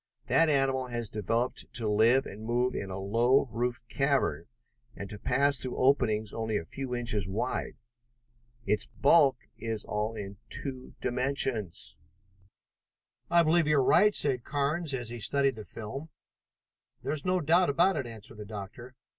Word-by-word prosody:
That 165 -1 +4
animal 135 -2 +1
has 120 -3 -3
been 110 - -3
developed 115 +5 -1
to 115 -3 +3
live 115 +5 +4
and 105 +3 -9
move 120 +2 0
in 100 - -4
a 95 - -5
low 115 +8 +2
roofed 120 +2 -2
cavern, 135 - 0 0.5
and 100 - -6
to 105 - -7
pass 140 +5 +2
through 130 - -2
openings 115 -6 +2
only 110 -2 -1
a 85 - -5
few 130 +5 -5
inches 115 -6 0
wide. 110 +7 -2 0.9
Its 105 - 0
bulk 140 -3 +4 0.2
is 110 -1 -4
all 105 +2 -2
in 100 -1 -7
two 130 -2 -5
dimensions!" 125 -6 0 1.3
"I 170 0 +5
believe 165 0 +3
you're 150 -3 +4
right," 210 +10 +5
said 130 -4 0
Carnes 150 +3 -1
as 120 -3 -5
he 120 0 -6
studied 140 +3 +1
the 110 -1 -9
film. 135 +8 -7 0.9
"There 145 - -1
is 150 -2 -4
no 185 0 +1
doubt 170 +2 +3
of 140 - -3 0.2
it," 130 - -3
answered 115 0 -10
the 105 - -8
doctor. 110 +4 -9
125 Hz, 160 wpm, -29 LUFS, 110-140 Hz, 1.3 s, I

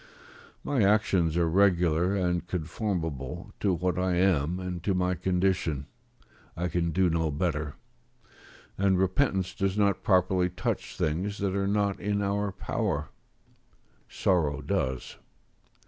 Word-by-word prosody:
My 140 -5 0
actions 95 -5 +2
are 85 -1 +3
regular, 90 0 +3
and 90 -2 0
conformable 80 - -3
to 100 - +2
what 90 +1 0
I 90 -1 +1
am 90 -2 +2
and 90 -2 -4
to 100 - +1
my 90 0 +1
condition; 90 -5 0 0.7
I 90 +1 -1
can 85 0 0
do 90 +3 +2
no 80 -1 +1
better; 75 -1 -2 1.0
and 95 -1 +3
repentance 95 -1 +1
does 95 0 -1
not 100 -2 +2
properly 90 -1 +2
touch 90 - -3
things 95 +7 -1
that 100 -1 -1
are 100 0 0
not 100 -1 0
in 100 0 -1
our 100 0 0
power; 75 -6 -2 1.0
sorrow 75 -6 +1
does.. 65 -7 -2
90 Hz, 130 wpm, -28 LUFS, 85-95 Hz, 1.0 s, are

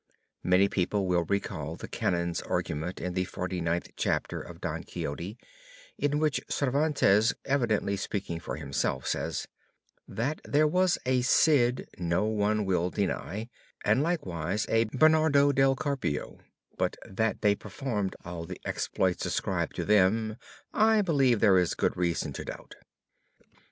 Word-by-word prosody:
Many 90 +2 +4
people 100 +1 0
will 90 -2 +1
recall 100 +4 -2
the - - -8
Canons' 85 -1 -1
argument 85 0 -3
in 90 - -3
the 90 0 0
forty 90 0 -4
ninth 85 +1 -1
chapter - - -1
of - - -11
Don - - -4
Quixote 85 +10 -5 0.6
in 145 0 0
which 155 -1 +1
Cervantes, 135 -6 +2
evidently 115 -7 +1
speaking 95 -3 -3
for - - -5
himself, 70 -3 -2
says: - - -2 0.6
"That 140 +7 -2
there 150 +2 +3
was 180 +3 +3
a 130 0 +2
Cid 125 -1 +3
no 85 +3 +1
one 105 -1 +1
will 90 -2 +1
deny 100 +2 -2 0.4
and 130 - +4
likewise 100 - -1
a 115 0 +3
Bernardo 145 +3 +4
Del 135 -1 +3
Carpio, 130 - -3 0.4
but - - 0
that 110 +3 -1
they 105 -1 +5
performed 105 0 -3
all 85 -1 -6
the - - -8
exploits 95 -2 -1
ascribed - - -1
to - - -2
them, 105 +2 +3 0.4
I 220 0 +4
believe 135 - +3
there 100 -5 +6
is 90 - 0
good - - 0
reason 85 -2 -1
to - - -6
doubt." - - -8
105 Hz, 140 wpm, -29 LUFS, 90-135 Hz, 0.6 s, there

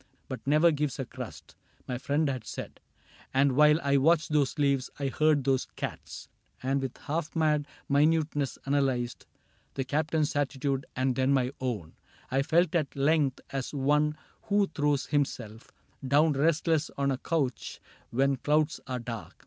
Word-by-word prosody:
But - - -5
never 155 +4 +5
gives 150 -3 -1
a 135 - -3
crust," - - -9 0.3
my 125 -1 -3
friend 145 +4 +1
had 130 -4 -2
said; - - -7 0.6
And 135 +1 +4
while 150 +3 +5
I 140 0 +3
watched 155 +3 +3
those 145 -3 +1
leaves, 140 -3 +1
and 140 -2 -2
heard 155 -1 +3
those 135 -1 +1
cats. - - -6 0.4
And 135 +1 +1
with 130 -2 -5
half 155 +2 -4
mad 150 -2 +2 0.2
minuteness 150 -1 +2
analyzed 135 -4 0 0.5
The 135 - -1
Captain's 155 +3 0
attitude 140 -1 -1
and 130 0 +1
then 130 +2 +2
my 130 -2 +1
own, 105 -11 -3 0.4
I 135 +1 +2
felt 165 +3 +2
at 155 -5 0
length 140 -1 +2
as 135 +1 -4
one 150 +2 +2 0.3
who 205 0 +4
throws 145 -2 +1
himself 120 -6 -2 0.4
Down 150 +3 +4
restless 160 +2 +1
on 140 0 +1
a 130 - -2
couch 140 -8 -2 0.3
when 135 +2 +1
clouds 150 +3 +1
are 130 -1 -2
dark. 115 -2 -7
140 Hz, 155 wpm, -29 LUFS, 130-150 Hz, 0.6 s, never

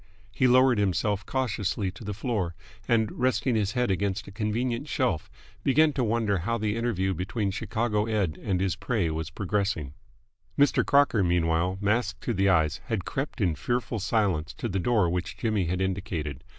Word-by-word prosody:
He 130 - +2
lowered 130 -2 +5
himself 100 +1 0
cautiously 105 -6 -1
to 90 - -12
the 105 -1 -4
floor, 100 -6 -2 0.3
and, 110 -2 +2
resting 125 0 +1
his 105 -2 0
head 125 -4 +1
against 95 +1 -1
a - - -9
convenient 115 +5 -2
shelf, 125 - -1 0.3
began 150 +3 +4
to 130 - 0
wonder 110 -4 +1
how 115 +7 -1
the 105 -1 -1
interview 105 -5 0
between 95 +4 -2
Chicago 110 +1 -1
Ed. 100 -8 -1
and 95 -3 0
his 95 -1 0
prey 105 -10 -1
was 80 0 -3
progressing. 95 -5 -2 0.6
Mr. 145 0 +4
Crocker, 140 -7 +4
meanwhile, 85 +1 +1
masked 105 0 0
to 120 - -1
the 100 -1 +2
eyes, 80 -3 +2
had 105 -7 -2
crept 135 -2 -3
in 90 -5 +2
fearful 115 +8 -2
silence 95 -5 0
to - - -3
the 95 -3 -1
door 105 -2 +2
which 90 +1 -3
Jimmy 110 -5 0
had 90 +2 -1
indicated. 90 - -3
105 Hz, 175 wpm, -27 LUFS, 90-115 Hz, 0.6 s, lowered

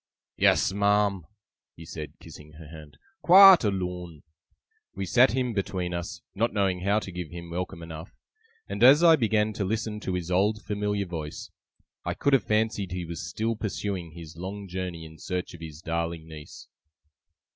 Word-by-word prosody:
'Yes, - - +3
ma'am,' 100 -3 +1 0.5
he 80 - -11
said, 80 -2 -7
kissing 75 0 -13
her 80 +1 -12
hand, 75 -2 -12 0.2
'quite 190 -1 +9
alone.' 90 -5 -3 0.7
We 95 0 -3
sat 120 +10 +4
him 125 -2 -1
between 95 -3 -2
us, 85 0 -5
not 115 +4 0
knowing 95 -3 +1
how 100 +3 +1
to 100 -3 -4
give 90 -3 -6
him 85 -1 -9
welcome 85 -1 -5
enough; 80 -1 -9 0.6
and - - -5
as 140 +6 +8
I 165 -2 +8
began 110 -5 +1
to 100 - -3
listen 110 +2 -2
to 95 -3 -3
his 90 0 -4
old 105 +3 +1
familiar 105 -1 -2
voice, 80 -4 -7 0.5
I - - -3
could 140 - +1
have 130 -6 +3
fancied 105 -3 0
he 90 -1 -4
was 85 +1 -6
still 110 +5 -2
pursuing 100 -5 -4
his 80 -2 -11
long 100 +3 -7
journey 90 -3 -5
in 80 -1 -13
search 90 0 -4
of 85 - -12
his 80 -1 -9
darling 85 -1 -3
niece. 75 -2 -11
95 Hz, 170 wpm, -27 LUFS, 85-105 Hz, 0.7 s, quite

